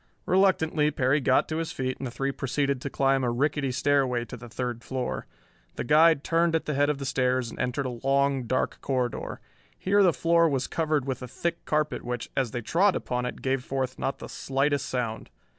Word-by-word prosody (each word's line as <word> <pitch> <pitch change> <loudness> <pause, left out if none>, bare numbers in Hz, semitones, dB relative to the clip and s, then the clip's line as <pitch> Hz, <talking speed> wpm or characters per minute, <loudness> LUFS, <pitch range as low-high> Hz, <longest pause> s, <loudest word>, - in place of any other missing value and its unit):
Reluctantly 165 -5 +3
Perry 140 0 +1
got 130 0 +3
to 155 - -3
his 165 -1 -2
feet 130 -1 -3
and 135 - -3
the - - -4
three 135 +3 -2
proceeded 140 0 -1
to 140 - -3
climb 135 0 +2
a 125 - +1
rickety 140 +2 0
stairway 130 -2 +1
to 125 - -8
the 120 0 -11
third 120 0 -4
floor. 130 -2 -3 0.5
The - - -3
guide 155 +2 +5
turned 165 0 +2
at 160 - 0
the 150 - -1
head 145 +1 +2
of 150 - 0
the 135 - -5
stairs 130 -2 0
and - - -11
entered 125 +3 -1
a 125 -2 -4
long 135 -1 +2
dark 130 +2 -1
corridor. 125 -3 -2 0.4
Here 200 +2 +2
the 185 -3 +6
floor 170 +1 +3
was 135 -3 0
covered 155 -4 0
with 130 -2 -3
a 125 - -6
thick 170 +6 -3
carpet 150 0 0
which, 120 -1 -4
as 130 -3 +1
they 120 +2 -4
trod 180 - +2
upon 125 0 -2
it, - - -7
gave 130 -1 0
forth 130 -1 -3
not 135 - -2
the - - -8
slightest 140 +1 -1
sound. 115 -3 -3
135 Hz, 210 wpm, -27 LUFS, 125-150 Hz, 0.5 s, the